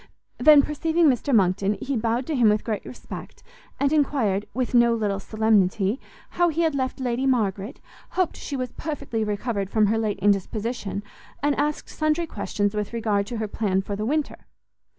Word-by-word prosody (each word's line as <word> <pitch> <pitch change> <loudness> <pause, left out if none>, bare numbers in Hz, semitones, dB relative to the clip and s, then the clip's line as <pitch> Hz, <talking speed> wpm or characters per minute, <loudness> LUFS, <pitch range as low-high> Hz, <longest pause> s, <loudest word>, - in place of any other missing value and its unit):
Then, 300 -2 +7
perceiving 325 +3 +1
Mr 255 +3 -2
Monckton, 195 -2 +2
he 275 +4 -2
bowed 235 +2 0
to 310 - -2
him 235 -4 +5
with 210 0 +1
great 215 -3 -3
respect, 250 - -9 0.4
and 280 +1 +2
enquired, 245 -10 +1
with 255 0 -2
no 235 -1 +5
little 205 -3 -1
solemnity, 215 0 +1 0.3
how 350 0 +2
he 330 +1 -1
had 320 -2 +2
left 260 0 -2
Lady 255 +1 -1
Margaret, 210 -1 0 0.4
hoped 370 -3 +1
she 285 - -6
was 255 -2 -3
perfectly 280 -8 -3
recovered 205 -1 -2
from 215 0 +3
her 220 +2 +1
late 215 -2 -1
indisposition, 205 +1 -1 0.4
and 290 0 +3
asked 295 +1 -1
sundry 310 +2 0
questions 205 - -2
with 210 +1 -3
regard 210 -3 0
to 240 - -4
her 220 -1 -2
plan 195 -3 0
for 200 - -4
the 210 - -3
winter. 300 +2 -2
230 Hz, 175 wpm, -24 LUFS, 205-280 Hz, 0.4 s, Then